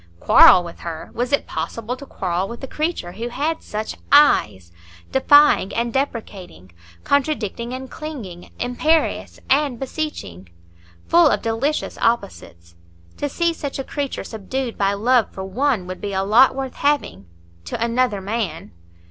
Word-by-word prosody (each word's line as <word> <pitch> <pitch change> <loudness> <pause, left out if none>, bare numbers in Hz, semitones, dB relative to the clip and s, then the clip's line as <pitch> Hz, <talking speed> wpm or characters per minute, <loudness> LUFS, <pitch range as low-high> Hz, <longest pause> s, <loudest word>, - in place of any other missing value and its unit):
Quarrel 180 - +7
with 170 -1 -10
her? 165 -2 -7
Was 245 +2 -2
it 280 - +1
possible 220 +9 -4
to 280 +2 -12
quarrel 185 0 -2
with 235 +4 -9
a - - -4
creature 305 - -3
who 230 +6 -5
had 305 +6 -2
such 215 +1 -5 0.2
eyes,—defying 105 - +3
and 235 0 -1
deprecating, 205 - -5 0.3
contradicting 250 -5 -1
and 260 +1 -6
clinging, 235 - -8
imperious 310 +6 0
and 275 -3 +1
beseeching,—full 85 - -2
of - - 0
delicious 235 +7 -2
opposites? 190 - -2 0.4
To 290 - -2
see 340 +4 0
such 285 -4 -5
a 270 - -3
creature 280 0 -4
subdued 235 +3 -5
by 200 0 +1
love 235 +3 +2
for 190 - -7
one 220 +1 0
would 185 0 -7
be 200 -1 -4
a 190 0 0
lot 235 +7 +5
worth 265 -1 -5
having—to 85 - -3
another 235 -3 0
man. 195 -5 -4
230 Hz, 140 wpm, -21 LUFS, 175-270 Hz, 0.4 s, Quarrel